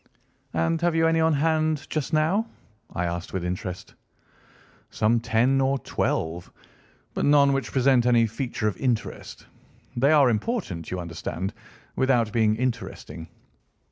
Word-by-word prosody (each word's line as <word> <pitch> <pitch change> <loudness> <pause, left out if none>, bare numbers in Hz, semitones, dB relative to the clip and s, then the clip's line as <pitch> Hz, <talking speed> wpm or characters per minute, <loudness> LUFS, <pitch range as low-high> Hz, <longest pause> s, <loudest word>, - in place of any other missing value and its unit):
"And 120 - +1
have 170 -1 +1
you 165 0 +3
any 165 0 +3
on 160 0 +3
hand 155 0 +1
just 155 -1 -3
now?" 170 +8 +2 0.4
I 90 - -2
asked 85 +1 -4
with 95 -2 -2
interest. 90 +1 -5 1.0
"Some 115 +2 +2
ten 120 +4 +2
or 135 +1 +2
twelve, 85 -8 -2 0.6
but - - -2
none 145 -1 +5
which 135 - -2
present 130 -2 +3
any 120 -2 +4
feature 115 0 -3
of 105 - -1
interest. 125 -4 -3 0.5
They 135 +5 +3
are 140 -5 +5
important, 105 - -3
you 90 - -3
understand, 85 +1 -5 0.4
without 120 -5 +2
being 110 -2 +3
interesting. 115 -8 -4
125 Hz, 140 wpm, -25 LUFS, 100-150 Hz, 1.0 s, none